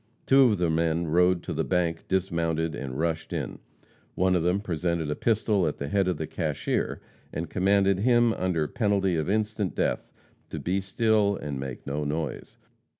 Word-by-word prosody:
Two 135 Hz, 0 st, +6 dB
of 110 Hz, -4 st, +3 dB
the 85 Hz, -2 st, +1 dB
men 80 Hz, +1 st, +1 dB
rode 90 Hz, +2 st, +3 dB
to -, -, -4 dB
the -, -, 0 dB
bank, 85 Hz, -3 st, -1 dB
dismounted 85 Hz, -3 st, 0 dB
and 65 Hz, -3 st, -5 dB
rushed 80 Hz, 0 st, -2 dB
in. -, -, -4 dB, 0.6 s
One 95 Hz, 0 st, +2 dB
of 90 Hz, -, +2 dB
them 90 Hz, +4 st, +1 dB
presented 85 Hz, -4 st, -2 dB
a -, -, -1 dB
pistol 105 Hz, -5 st, +1 dB
at 75 Hz, -, -3 dB
the 70 Hz, -, -4 dB
head 100 Hz, +2 st, +2 dB
of 90 Hz, -, 0 dB
the 80 Hz, -, -3 dB
cashier, -, -, -2 dB, 0.3 s
and 80 Hz, +1 st, -5 dB
commanded 95 Hz, 0 st, +3 dB
him, 120 Hz, +1 st, +4 dB
under 85 Hz, -6 st, 0 dB
penalty 100 Hz, -7 st, +1 dB
of 80 Hz, +1 st, -1 dB
instant 105 Hz, -2 st, -1 dB
death, -, -, -1 dB, 0.4 s
to -, -, -5 dB
be 95 Hz, +2 st, -1 dB
still 105 Hz, +1 st, +2 dB
and 70 Hz, -6 st, -5 dB
make 65 Hz, -2 st, -6 dB
no 75 Hz, +2 st, -2 dB
noise. 75 Hz, +2 st, -4 dB
90 Hz, 180 wpm, -27 LUFS, 80-100 Hz, 0.6 s, Two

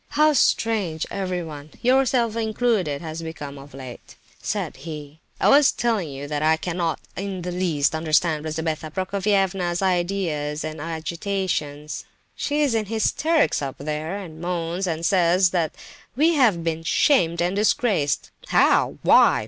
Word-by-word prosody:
"How 305 Hz, 0 st, +5 dB
strange 210 Hz, -, +1 dB
everyone, 175 Hz, -6 st, -4 dB
yourself 250 Hz, -3 st, +3 dB
included, 220 Hz, -9 st, 0 dB
has 160 Hz, 0 st, -5 dB
become 145 Hz, -4 st, -7 dB
of 140 Hz, 0 st, -13 dB
late," 130 Hz, -3 st, -10 dB, 0.3 s
said -, -, -3 dB
he. 150 Hz, -2 st, -8 dB, 0.2 s
"I -, -, +3 dB
was 285 Hz, 0 st, +6 dB
telling 220 Hz, -9 st, -1 dB
you 140 Hz, +1 st, -7 dB
that 150 Hz, 0 st, -2 dB
I 160 Hz, +1 st, +3 dB
cannot 170 Hz, 0 st, -2 dB, 0.2 s
in 195 Hz, -2 st, -4 dB
the 180 Hz, -, -3 dB
least 170 Hz, -6 st, +1 dB
understand 160 Hz, 0 st, +1 dB
Lizabetha 160 Hz, 0 st, -3 dB
Prokofievna's 190 Hz, -1 st, 0 dB
ideas 175 Hz, -5 st, -1 dB
and 155 Hz, -1 st, -5 dB
agitations. 160 Hz, -2 st, -3 dB, 0.3 s
She 295 Hz, +1 st, -1 dB
is 275 Hz, -5 st, +1 dB
in 220 Hz, -1 st, 0 dB
hysterics 285 Hz, -, +1 dB
up 135 Hz, -2 st, -4 dB
there, 155 Hz, +5 st, -3 dB
and 165 Hz, -5 st, -9 dB
moans 175 Hz, +1 st, -2 dB
and 165 Hz, -1 st, -2 dB
says 180 Hz, -1 st, +4 dB
that 170 Hz, -4 st, 0 dB, 0.4 s
we 315 Hz, +6 st, +4 dB
have 225 Hz, -, +3 dB
been 165 Hz, -1 st, -1 dB
'shamed 170 Hz, -, +2 dB
and 175 Hz, +2 st, +1 dB
disgraced.' 205 Hz, -, +1 dB, 0.2 s
How? -, -, +3 dB
Why? -, -, +6 dB
175 Hz, 140 wpm, -23 LUFS, 155-200 Hz, 0.4 s, was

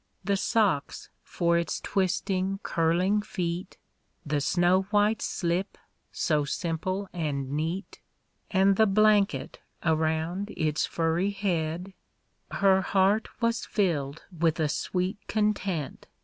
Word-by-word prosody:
The 200 Hz, +2 st, +1 dB
socks 195 Hz, -, 0 dB
for 170 Hz, -1 st, +1 dB
its 170 Hz, -, -2 dB
twisting, 190 Hz, 0 st, -1 dB
curling 175 Hz, +5 st, +2 dB
feet. 180 Hz, -2 st, -4 dB, 0.5 s
The 145 Hz, 0 st, 0 dB
snow 175 Hz, +4 st, +3 dB
white 210 Hz, +1 st, +2 dB
slip, 175 Hz, +3 st, -2 dB, 0.3 s
so 150 Hz, -2 st, +1 dB
simple 180 Hz, +6 st, -2 dB
and 140 Hz, -6 st, -2 dB
neat. 165 Hz, +6 st, -3 dB, 0.5 s
And 195 Hz, 0 st, +3 dB
the 220 Hz, -, +5 dB
blanket 210 Hz, 0 st, +2 dB, 0.2 s
around 160 Hz, +5 st, 0 dB
its 155 Hz, -3 st, 0 dB
furry 165 Hz, +4 st, 0 dB
head 180 Hz, -2 st, -2 dB, 0.6 s
‚ÄĒ -, -, -5 dB
Her 190 Hz, -1 st, +5 dB
heart 195 Hz, +3 st, +2 dB
was 230 Hz, 0 st, +1 dB
filled 155 Hz, -8 st, -1 dB
with 165 Hz, -1 st, +1 dB
a 155 Hz, -2 st, +1 dB
sweet 185 Hz, +6 st, -2 dB
content. 200 Hz, -7 st, -1 dB
185 Hz, 115 wpm, -27 LUFS, 160-200 Hz, 0.6 s, the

